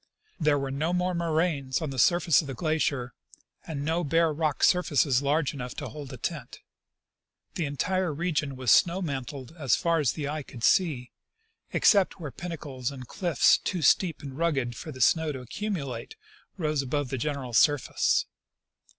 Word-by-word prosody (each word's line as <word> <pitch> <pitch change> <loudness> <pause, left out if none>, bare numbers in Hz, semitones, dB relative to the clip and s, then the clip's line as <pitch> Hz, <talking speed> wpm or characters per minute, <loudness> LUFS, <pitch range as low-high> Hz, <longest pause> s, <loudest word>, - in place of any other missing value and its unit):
There 150 -3 +3
were 135 -1 -3
no 155 +6 -1
more 180 0 0
moraines 160 -5 0
on 155 -4 -4
the 130 - -4
surface 170 +5 +4
of 150 - -9
the 135 - -5
glacier, 140 -5 -1 0.5
and 145 -3 -4
no 165 +3 0
bare 165 +1 +2
rock 155 -2 -1
surfaces 145 -7 +3
large 145 +1 +1
enough 125 -3 -6
to - - -5
hold 145 -3 -9
a - - -7
tent. 150 -9 -5 0.9
The 170 - -2
entire 180 +5 -1
region 150 -3 -2
was 130 -3 +1
snow 180 +2 +4
mantled 140 -1 -5
as 135 -7 +3
far 170 -1 +1
as 140 -6 +1
the 150 -3 -4
eye 150 +1 -3
could 125 -4 -11
see, 145 -9 +2 0.6
except 200 -2 +3
where 150 -5 -6
pinnacles 145 -8 -5
and 130 -3 -9
cliff's 175 0 +3
too 180 -4 -3
steep 165 +3 +3
and 135 -2 -7
rugged 140 -7 0
for 155 - -7
the 130 -2 -8
snow 160 +5 +3
to 130 -2 -7
accu 210 - -4
mulate 135 - -5 0.4
rose 155 -5 0
above 140 0 -2
the 130 -1 -3
general 135 -2 -3
surface. 145 +4 +3
150 Hz, 175 wpm, -27 LUFS, 135-165 Hz, 0.9 s, surface